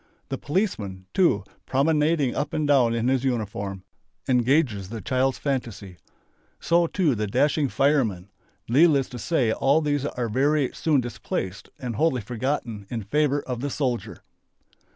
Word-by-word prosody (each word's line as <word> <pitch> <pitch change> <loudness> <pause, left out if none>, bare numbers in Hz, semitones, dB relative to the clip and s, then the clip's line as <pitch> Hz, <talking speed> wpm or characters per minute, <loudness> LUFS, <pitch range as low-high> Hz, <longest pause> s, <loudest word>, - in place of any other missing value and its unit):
The 135 - -2
"policeman" 110 - -2
too, 185 -2 +3 0.2
promenading 150 0 +2
up 145 +1 -3
and 155 -1 0
down 125 -5 +4
in 115 +1 0
his 130 -1 +1
uniform, 100 -6 -3 0.4
engages 125 - +2
the 115 0 -5
child's 130 +5 0
fantasy. 115 -9 -4 0.6
So 170 0 +2
too 165 -5 +1
the 105 -2 -2
dashing 140 +6 +1
"fireman." 115 -11 +1 0.4
Needless 140 +1 +4
to 125 - -8
say 130 -6 +1
all 140 +6 +3
these 145 -2 0
are 125 -4 -3
very 140 +4 +1
soon 150 -5 +1
displaced 100 -5 -5
and 120 -4 -5
wholly 155 -5 +2
forgotten 115 -2 -3
in 115 -3 -4
favour 145 +6 +1
of 125 -2 -4
the 145 - -2
"soldier." 125 -4 -3
130 Hz, 145 wpm, -25 LUFS, 115-145 Hz, 0.6 s, down